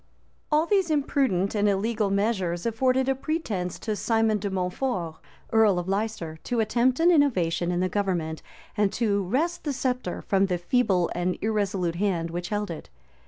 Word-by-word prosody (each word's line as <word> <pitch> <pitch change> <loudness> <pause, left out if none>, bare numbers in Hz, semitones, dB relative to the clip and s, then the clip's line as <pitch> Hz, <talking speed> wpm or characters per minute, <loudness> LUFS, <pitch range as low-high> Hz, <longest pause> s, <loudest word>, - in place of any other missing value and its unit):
} - - -40
All 305 +2 +3
these 385 -1 +2
imprudent 270 - +1
and 210 -1 +2
illegal 210 +1 0
measures 195 -4 0
afforded 255 +3 +1
a 270 - +3
pretence 255 - -3
to 215 -2 -2
Simon 225 0 +1
de 200 +1 -3
Mountfort, 180 -2 -2 0.4
earl 220 -4 +5
of 175 0 -3
Leicester, 195 -5 -2
to 245 - -1
attempt 245 +4 +2
an 340 +2 +5
innovation 180 - +2
in 175 0 0
the 185 - +2
government, 175 -5 -2 0.3
and 205 -2 +2
to 205 -4 +1
wrest 310 - -1
the 290 - -2
sceptre 250 -7 -2
from 195 0 +2
the 180 -2 0
feeble 180 -1 +1
and 175 +1 -1
irresolute 195 -5 0
hand 175 -4 0
which 175 +1 -4
held 210 -3 -2
it. 160 - -8
205 Hz, 170 wpm, -26 LUFS, 180-250 Hz, 0.4 s, earl